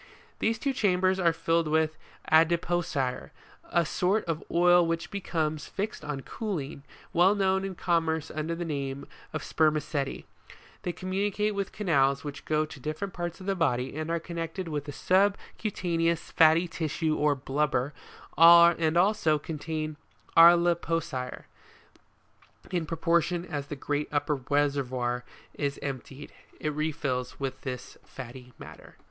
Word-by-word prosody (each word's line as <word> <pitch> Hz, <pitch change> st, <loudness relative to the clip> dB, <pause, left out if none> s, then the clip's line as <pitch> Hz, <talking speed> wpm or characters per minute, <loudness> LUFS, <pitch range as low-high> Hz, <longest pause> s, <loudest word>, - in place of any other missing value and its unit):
These 225 Hz, 0 st, +1 dB
two 275 Hz, +4 st, -1 dB
chambers 185 Hz, -4 st, +2 dB
are 170 Hz, -2 st, +4 dB
filled 165 Hz, 0 st, 0 dB
with 155 Hz, 0 st, +1 dB, 0.4 s
adipocire, 165 Hz, -5 st, +2 dB, 0.4 s
a 170 Hz, -1 st, +3 dB
sort 185 Hz, +7 st, +1 dB
of 165 Hz, -2 st, -3 dB
oil 175 Hz, 0 st, +5 dB
which 165 Hz, 0 st, -2 dB
becomes 155 Hz, -6 st, -2 dB
fixed 205 Hz, +2 st, -4 dB
on 150 Hz, -2 st, -4 dB
cooling, 155 Hz, -8 st, -5 dB, 0.3 s
well 185 Hz, +4 st, +5 dB
known 190 Hz, -1 st, +1 dB
in 195 Hz, -1 st, -4 dB
com 170 Hz, -1 st, +1 dB
merce 160 Hz, -1 st, -2 dB
under 155 Hz, +2 st, -2 dB
the 175 Hz, +1 st, -4 dB
name 140 Hz, -3 st, -4 dB, 0.3 s
of -, -, -4 dB
Spermaceti: 150 Hz, -3 st, 0 dB, 0.6 s
they 175 Hz, -, -2 dB
communicate 200 Hz, +3 st, -1 dB
with 200 Hz, -1 st, -3 dB
canals 140 Hz, -9 st, +1 dB
which 145 Hz, -2 st, -7 dB
go 155 Hz, 0 st, +1 dB
to 155 Hz, -2 st, -11 dB
different 155 Hz, +8 st, -4 dB
parts 175 Hz, 0 st, -4 dB
of 185 Hz, -, -10 dB
the 195 Hz, -, +1 dB
body 130 Hz, -8 st, 0 dB
and 155 Hz, +1 st, -4 dB
are 170 Hz, 0 st, 0 dB
connected 170 Hz, +2 st, -5 dB
with 150 Hz, -3 st, -3 dB
the 145 Hz, -, -6 dB
sub 195 Hz, +6 st, +2 dB, 0.2 s
cutaneous 170 Hz, -5 st, -1 dB
fatty 165 Hz, +2 st, +5 dB
tissue 160 Hz, -1 st, -1 dB
or 150 Hz, -1 st, +2 dB
blubber, 140 Hz, 0 st, -1 dB, 0.4 s
and 170 Hz, -1 st, +7 dB
also 180 Hz, -5 st, +3 dB
contain 155 Hz, 0 st, -4 dB, 0.4 s
arlipocire: 165 Hz, -5 st, +4 dB, 1.3 s
in 175 Hz, -4 st, -1 dB
proportion 170 Hz, +1 st, +1 dB
as 145 Hz, -5 st, -5 dB
the 145 Hz, -, -5 dB
great 145 Hz, +2 st, -2 dB
upper 145 Hz, 0 st, 0 dB
reservoir 130 Hz, -4 st, 0 dB, 0.3 s
is 140 Hz, -1 st, -2 dB
emptied, 140 Hz, +1 st, -6 dB, 0.3 s
it 150 Hz, -1 st, -2 dB
refills 145 Hz, -5 st, -2 dB
with 135 Hz, -1 st, -4 dB
this 125 Hz, -2 st, -7 dB
fatty 125 Hz, 0 st, -10 dB
matter. -, -, -12 dB
160 Hz, 140 wpm, -28 LUFS, 145-175 Hz, 1.3 s, and